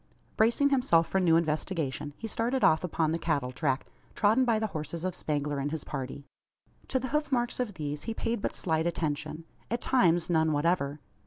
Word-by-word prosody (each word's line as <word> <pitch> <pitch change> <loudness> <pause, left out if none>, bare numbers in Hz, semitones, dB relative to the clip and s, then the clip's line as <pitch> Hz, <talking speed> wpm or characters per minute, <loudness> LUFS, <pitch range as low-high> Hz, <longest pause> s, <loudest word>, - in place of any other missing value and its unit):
Bracing 235 +6 +3
himself 245 -12 +4
for 190 - 0
a - - +1
new 165 -3 +4
investigation, 155 -3 -1
he - - -7
started 235 +4 -1
off 160 - +5
upon 160 -3 0
the 165 - -1
cattle 140 -7 0
track, 135 0 -1 0.3
trodden 220 +5 +4
by 230 -2 +3
the 220 - 0
horses 160 +2 -4
of 185 -1 -1
Spangler 145 -2 -2
and 140 +1 -1
his 155 0 -4
party. 135 0 -5 0.6
To 265 - 0
the 260 0 -3
hoof 300 +1 -1
marks 240 -1 0
of 225 -6 -2
these 150 -2 -4
he 225 - -3
paid 230 -2 -2
but - - -2
slight 160 -1 0
attention; 155 -1 -2 0.3
at 235 - -1
times, 175 -11 +3
none 160 -2 +2
whatever. 145 -2 +1
165 Hz, 195 wpm, -29 LUFS, 150-225 Hz, 0.6 s, off